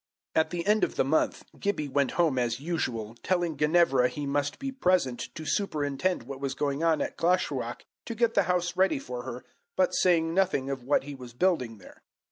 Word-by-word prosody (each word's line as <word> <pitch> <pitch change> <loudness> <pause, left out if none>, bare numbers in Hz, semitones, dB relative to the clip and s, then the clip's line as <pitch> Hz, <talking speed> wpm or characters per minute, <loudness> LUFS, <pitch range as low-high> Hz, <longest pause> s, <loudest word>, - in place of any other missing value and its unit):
At 160 - +2
the 175 -1 -3
end 210 +1 +3
of - - 0
the - - +3
month 145 +4 0
Gibbie 200 -7 -1
went 140 0 +1
home 160 -7 +2
as 120 -1 0
usual, 125 -9 -3
telling 175 -3 0
Ginevra 150 -4 +4
he 145 +2 -5
must 145 +1 -1
be 275 -1 -4
present 180 - +1
to 155 - -7
superintend 155 - -1
what 135 +2 -8
was 135 -1 -3
going 140 +1 -1
on 165 -2 +3
at - - -6
Glashruach 150 -9 0 0.2
to 230 - -4
get 235 0 +2
the 200 - +4
house 180 0 +1
ready 190 -3 +3
for 125 -2 -6
her, 125 -1 -7 0.3
but 185 - +3
saying 165 -3 +3
nothing 175 -8 +1
of 135 -2 -4
what 135 +3 +1
he 145 +1 -7
was 125 -3 -10
building 125 -7 0
there. 95 - -16
150 Hz, 200 wpm, -28 LUFS, 130-180 Hz, 0.3 s, Ginevra